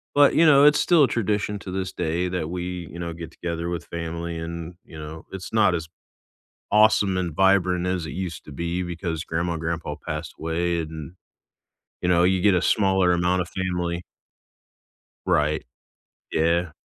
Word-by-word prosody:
But, 145 Hz, -1 st, +6 dB
you 165 Hz, -, +5 dB
know, 140 Hz, -2 st, +7 dB
it's 150 Hz, 0 st, +6 dB
still 170 Hz, -4 st, +5 dB
a 135 Hz, -, +5 dB
tradition 105 Hz, -2 st, -1 dB
to 95 Hz, -, -8 dB
this 95 Hz, 0 st, -3 dB
day 85 Hz, +1 st, -1 dB
that 90 Hz, -3 st, -3 dB
we, 90 Hz, -1 st, -4 dB
you 85 Hz, -, -9 dB
know, 85 Hz, -1 st, -4 dB
get 85 Hz, 0 st, -8 dB
together 85 Hz, 0 st, -4 dB
with 85 Hz, -1 st, -4 dB
family 85 Hz, 0 st, -5 dB
and, 85 Hz, +1 st, -6 dB
you 80 Hz, -, -12 dB
know, 75 Hz, +1 st, -8 dB
it's 95 Hz, +1 st, -7 dB
not 105 Hz, -5 st, +4 dB
as 80 Hz, -1 st, -4 dB, 0.8 s
awesome 105 Hz, -3 st, +4 dB
and 90 Hz, -3 st, -2 dB
vibrant 90 Hz, 0 st, +3 dB
as 90 Hz, -3 st, -1 dB
it -, -, -6 dB
used 90 Hz, -4 st, -5 dB
to -, -, -12 dB
be, 85 Hz, +4 st, -2 dB
because 85 Hz, -2 st, -4 dB
grandma 85 Hz, +1 st, -2 dB
and 80 Hz, -, -5 dB
grandpa 85 Hz, -2 st, -3 dB
passed 75 Hz, 0 st, -4 dB
away 85 Hz, +2 st, -1 dB
and, 80 Hz, 0 st, -7 dB, 0.9 s
you 90 Hz, -, -1 dB
know, 85 Hz, -1 st, +4 dB
you 95 Hz, 0 st, +3 dB
get 100 Hz, +1 st, +4 dB
a 90 Hz, -, +2 dB
smaller 95 Hz, -3 st, +3 dB
amount 90 Hz, +1 st, +2 dB
of 85 Hz, -, -9 dB
family. 90 Hz, -2 st, -2 dB, 1.3 s
Right. 75 Hz, +1 st, +1 dB, 0.7 s
Yeah. 85 Hz, +1 st, +1 dB
85 Hz, 180 wpm, -24 LUFS, 85-95 Hz, 1.3 s, know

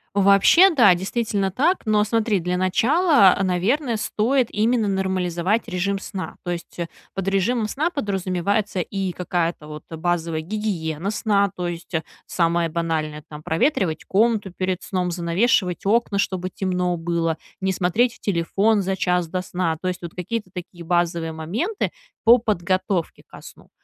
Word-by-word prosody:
Вообще, 200 Hz, -, +6 dB
да, 230 Hz, -, +6 dB
действительно 195 Hz, +1 st, -1 dB
так. 300 Hz, -, +1 dB
Но 210 Hz, -1 st, +3 dB
смотри, 215 Hz, -3 st, +1 dB
для 180 Hz, +1 st, -1 dB
начала, 230 Hz, -, +4 dB
наверное, 225 Hz, -, 0 dB
стоит 230 Hz, +4 st, +1 dB
именно 220 Hz, 0 st, +1 dB
нормализовать 190 Hz, +1 st, -1 dB
режим 195 Hz, +2 st, -1 dB
сна. 195 Hz, -1 st, -6 dB
То 175 Hz, -, -3 dB
есть 170 Hz, -1 st, -7 dB, 0.4 s
под 195 Hz, -1 st, -4 dB
режимом 215 Hz, +3 st, 0 dB
сна 300 Hz, +8 st, 0 dB
подразумевается 200 Hz, -, -1 dB
и 195 Hz, 0 st, -3 dB
какая-то, 170 Hz, -3 st, -2 dB
вот, 150 Hz, 0 st, -8 dB
базовая 165 Hz, -1 st, -2 dB
гигиена 185 Hz, -2 st, -3 dB
сна. 200 Hz, -2 st, +1 dB
То 175 Hz, -1 st, -2 dB
есть 170 Hz, +1 st, -8 dB, 0.4 s
самое 170 Hz, -1 st, +1 dB
банальное, 155 Hz, -2 st, -2 dB
там: 150 Hz, 0 st, -9 dB
проветривать 175 Hz, -, 0 dB
комнату 210 Hz, -1 st, +1 dB
перед 185 Hz, 0 st, -3 dB
сном, 180 Hz, -2 st, -2 dB
занавешивать 180 Hz, +2 st, +1 dB
окна, 210 Hz, -1 st, +2 dB
чтобы 185 Hz, -2 st, -1 dB
темно 180 Hz, -2 st, -1 dB
было, 165 Hz, -1 st, -1 dB, 0.2 s
не 190 Hz, -, +1 dB
смотреть 215 Hz, +7 st, +1 dB
в -, -, -21 dB
телефон 200 Hz, +3 st, +1 dB
за 190 Hz, 0 st, -2 dB
час 180 Hz, -2 st, 0 dB
до 185 Hz, +1 st, -2 dB
сна. 175 Hz, -3 st, -2 dB
То 185 Hz, -, -3 dB
есть 180 Hz, -, -3 dB
вот 170 Hz, -1 st, -6 dB
какие-то 185 Hz, +2 st, -4 dB
такие 175 Hz, -1 st, -8 dB
базовые 170 Hz, -1 st, 0 dB
моменты 205 Hz, -, -2 dB, 0.3 s
по 235 Hz, +2 st, +8 dB
подготовке 185 Hz, -4 st, -1 dB
ко -, -, -13 dB
сну. -, -, -14 dB
185 Hz, 150 wpm, -22 LUFS, 175-215 Hz, 0.4 s, по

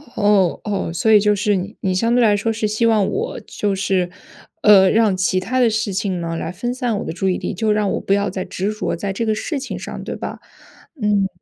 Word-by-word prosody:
哦 205 Hz, -4 st, +2 dB
哦， 200 Hz, -5 st, -2 dB
所 200 Hz, +6 st, +1 dB
以 215 Hz, -, +8 dB
就 210 Hz, 0 st, +2 dB
是 205 Hz, +1 st, +1 dB
你 190 Hz, +2 st, -4 dB
你 190 Hz, -, 0 dB
相 230 Hz, +5 st, +1 dB
对 245 Hz, -, +4 dB
来 210 Hz, -2 st, +4 dB
说 215 Hz, +3 st, -1 dB
是 220 Hz, -1 st, -1 dB
希 215 Hz, +2 st, 0 dB
望 215 Hz, -4 st, +3 dB
我， 440 Hz, +4 st, -3 dB
就 205 Hz, -1 st, -2 dB
是， 190 Hz, -2 st, 0 dB, 0.5 s
呃， 195 Hz, -3 st, +7 dB
让 215 Hz, -2 st, +3 dB
其 185 Hz, 0 st, +1 dB
他 250 Hz, +8 st, -2 dB
的 245 Hz, -2 st, +4 dB
事 215 Hz, -2 st, -1 dB
情 190 Hz, -1 st, -1 dB
呢， 165 Hz, -1 st, -3 dB
来 165 Hz, -, -4 dB
分 240 Hz, +7 st, -3 dB
散 245 Hz, -4 st, -1 dB
我 -, -, -5 dB
的 -, -, -4 dB
注 190 Hz, +2 st, -1 dB
意 180 Hz, -, 0 dB
力， -, -, -4 dB
就 215 Hz, +3 st, 0 dB
让 210 Hz, -1 st, +1 dB
我 -, -, -1 dB
不 195 Hz, -, 0 dB
要 200 Hz, +1 st, +1 dB
再 185 Hz, 0 st, -4 dB
执 195 Hz, +3 st, -3 dB
着 215 Hz, -, -2 dB
在 195 Hz, +3 st, -3 dB
这 230 Hz, +4 st, -2 dB
个 220 Hz, -, +1 dB
事 295 Hz, +8 st, -3 dB
情 270 Hz, -, -6 dB
上， -, -, -7 dB
对 -, -, -5 dB
吧？ -, -, -6 dB, 0.6 s
嗯。 205 Hz, -2 st, +2 dB
205 Hz, 270 characters per minute, -20 LUFS, 190-220 Hz, 0.6 s, 以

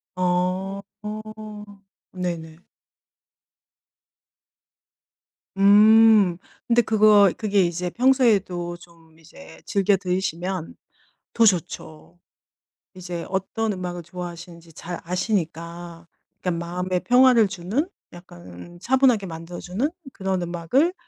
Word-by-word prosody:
어. 185 Hz, +2 st, -1 dB, 1.3 s
네네. 170 Hz, -3 st, -5 dB, 3.0 s
음. 210 Hz, -2 st, +6 dB, 0.3 s
근데 240 Hz, 0 st, +4 dB
그거 210 Hz, -3 st, +5 dB
그게 205 Hz, -3 st, +1 dB
이제 175 Hz, +1 st, -2 dB
평소에도 210 Hz, -9 st, +1 dB
좀 165 Hz, -2 st, -20 dB
이제 170 Hz, -, -15 dB
즐겨 200 Hz, -1 st, +2 dB
들으시면 180 Hz, -1 st, -3 dB, 0.6 s
더 230 Hz, -, +4 dB
좋죠. 175 Hz, -3 st, -2 dB, 0.8 s
이제 175 Hz, -2 st, -6 dB
어떤 210 Hz, +3 st, -2 dB
음악을 180 Hz, -1 st, -6 dB
좋아하시는지 170 Hz, -1 st, -9 dB
잘 175 Hz, +3 st, -7 dB
아시니까 170 Hz, -2 st, -4 dB, 0.3 s
그러니까 170 Hz, -2 st, -2 dB
마음에 180 Hz, +1 st, -2 dB
평화를 245 Hz, -2 st, +5 dB
주는 195 Hz, -, -2 dB, 0.3 s
약간 130 Hz, -, -13 dB
차분하게 250 Hz, -4 st, +2 dB
만들어 165 Hz, +1 st, -8 dB
주는 210 Hz, +12 st, -2 dB, 0.2 s
그런 190 Hz, -1 st, -2 dB
음악을 175 Hz, -, 0 dB
180 Hz, 210 characters per minute, -23 LUFS, 170-205 Hz, 3.0 s, 음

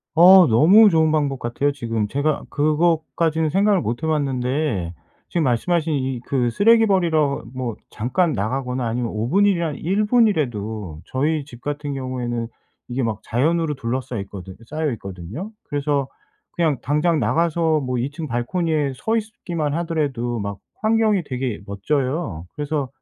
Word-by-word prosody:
어 180 Hz, +2 st, +9 dB
너무 185 Hz, -, +6 dB
좋은 160 Hz, -1 st, +3 dB
방법 145 Hz, -4 st, 0 dB
같아요 130 Hz, +5 st, 0 dB
지금. 115 Hz, -6 st, -2 dB
제가 145 Hz, +5 st, -1 dB
그것까지는 160 Hz, +1 st, +1 dB
생각을 195 Hz, +1 st, +3 dB
못 120 Hz, +7 st, -3 dB
해 160 Hz, -, 0 dB
봤는데 130 Hz, -, -1 dB, 0.4 s
지금 170 Hz, -, 0 dB
말씀하신 160 Hz, +6 st, +1 dB
이 130 Hz, -3 st, -1 dB
그 125 Hz, -3 st, +1 dB
쓰레기 225 Hz, -, +5 dB
버리러 160 Hz, -8 st, +1 dB
뭐 125 Hz, -3 st, -4 dB
잠깐 155 Hz, -, 0 dB
나가거나 125 Hz, +4 st, -2 dB
아니면 120 Hz, 0 st, -2 dB
5 105 Hz, +2 st, -2 dB
분 200 Hz, +9 st, +3 dB
일이나 170 Hz, -5 st, +1 dB
1 190 Hz, +8 st, 0 dB
분이라도 110 Hz, -, 0 dB
저희 150 Hz, +3 st, 0 dB
집 120 Hz, -4 st, -13 dB
같은 145 Hz, -1 st, -4 dB
경우에는 120 Hz, -3 st, -3 dB, 0.4 s
이게 125 Hz, +2 st, -2 dB
막 110 Hz, -4 st, -2 dB
자연으로 155 Hz, +6 st, +1 dB
둘러싸여 125 Hz, -2 st, -3 dB
있거든 95 Hz, -2 st, -10 dB
싸여 155 Hz, +1 st, -1 dB
있거든요. 100 Hz, -, -7 dB, 0.2 s
그래서 145 Hz, -1 st, -1 dB, 0.4 s
그냥 160 Hz, -5 st, +1 dB
당장 150 Hz, +3 st, +1 dB
나가서 165 Hz, -1 st, +1 dB
뭐 125 Hz, -3 st, -2 dB
2 130 Hz, +4 st, -2 dB
층 155 Hz, +1 st, -6 dB
발코니에 145 Hz, +4 st, -1 dB
서 225 Hz, -, 0 dB
있기만 175 Hz, -9 st, -3 dB
하더라도 145 Hz, -8 st, -1 dB
막 100 Hz, -1 st, -4 dB, 0.2 s
환경이 215 Hz, -4 st, +3 dB
되게 125 Hz, -4 st, -3 dB
멋져요. 125 Hz, -, -2 dB
그래서 145 Hz, -2 st, -2 dB
145 Hz, 325 characters per minute, -22 LUFS, 120-165 Hz, 0.4 s, 어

